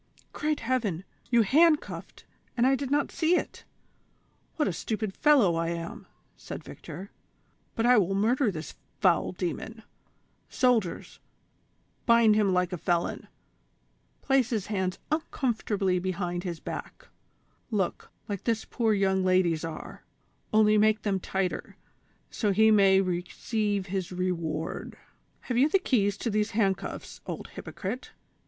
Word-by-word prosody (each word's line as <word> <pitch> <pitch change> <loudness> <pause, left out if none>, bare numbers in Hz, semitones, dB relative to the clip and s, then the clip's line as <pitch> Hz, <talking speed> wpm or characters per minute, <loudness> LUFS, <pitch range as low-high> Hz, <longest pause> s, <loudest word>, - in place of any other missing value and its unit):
"Great 305 0 -1
heaven! 225 -8 -1 0.3
you 235 -2 +5
handcuffed, 305 +8 +2 0.3
and 240 - +4
I 270 +1 +4
not 290 0 +1
see 335 +2 +2
it; - - -3 0.9
what 305 - +1
a - - -1
stupid 215 +3 -3
fellow 265 - +4
I 165 0 0
am," 170 0 -6 0.3
said - - -8
Victor; 195 +3 -9 0.6
"but 225 - 0
I 245 -2 +6
will 195 0 +1
murder 235 +5 +2
this 160 -5 -6 0.3
foul 185 -4 +3
demon; 185 +5 -5 0.7
soldiers, 235 -9 0 0.9
bind 235 -2 +6
him 210 -2 +3
like 180 0 +1
a 180 - -4
felon, 175 0 -1 1.0
place 270 -3 +3
his 220 -6 -1
hands 190 -3 -2
uncomfortably 220 - 0
behind 180 -1 -3
his 175 -4 -4
back; - - -7 0.6
look, 200 -6 -2 0.2
like 200 -3 -5
this 225 -2 0
poor 225 -3 +1
young 190 -1 +2
lady's 185 -3 +2
are, 165 -1 -7 0.5
only 215 0 +5
make 215 0 +3
them 195 -2 0
tighter, 190 0 -3 0.6
so 210 -3 0
he 220 +3 +5
may 195 -2 +6
re 180 -2 -1
ceive 210 -4 -1
his 190 -1 -3
reward." 170 -3 -3 0.2
" - - -41
Have 245 -2 -1
you 285 +4 +5
the 390 - +4
keys 205 - +1
to 230 - -2
these 210 +1 +1
handcuffs, 195 -4 -1
old - - -6
hypocrite 220 +7 -6
205 Hz, 135 wpm, -28 LUFS, 185-235 Hz, 1.0 s, I